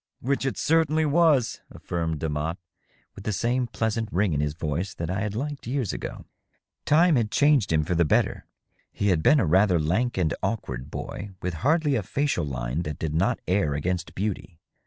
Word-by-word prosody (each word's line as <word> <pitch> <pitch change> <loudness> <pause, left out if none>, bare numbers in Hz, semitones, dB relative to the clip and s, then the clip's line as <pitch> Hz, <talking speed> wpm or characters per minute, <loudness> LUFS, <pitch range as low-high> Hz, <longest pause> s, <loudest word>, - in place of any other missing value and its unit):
" - - -61
Which 135 +1 -1
it 135 - -2
certainly 160 -1 +2
was," 150 -5 +3
affirmed 80 -3 -3
Demotte, 80 +2 -2 0.6
with 100 - -11
the 105 - -1
same 120 +5 0
pleasant 110 0 -2
ring 95 -1 +1
in 70 - 0
his 75 0 -2
voice 85 +4 -3
that 85 +1 -3
I 95 - -1
had 105 0 -3
liked 140 +1 -4
years 125 -4 -1
ago. - - -6 0.6
Time 165 0 +5
had 110 -3 +1
changed 145 - +3
him 80 -1 +3
for 85 - -2
the 85 0 +3
better. 75 - +1 0.4
He 100 - 0
had 85 -4 +2
been 150 - +5
a 115 - +2
rather 90 +2 +4
lank 100 +11 0
and 85 -4 +1
awkward 70 - -3
boy, 100 0 -6
with 90 0 -1
hardly 145 - +2
a 120 - +1
facial 140 - -1
line 65 +2 -3
that 75 -4 -4
did 80 -2 -3
not 100 +10 +1
err 90 -6 +1
against 90 +4 -2
beauty. 95 -3 -3
100 Hz, 195 wpm, -26 LUFS, 80-130 Hz, 0.6 s, Time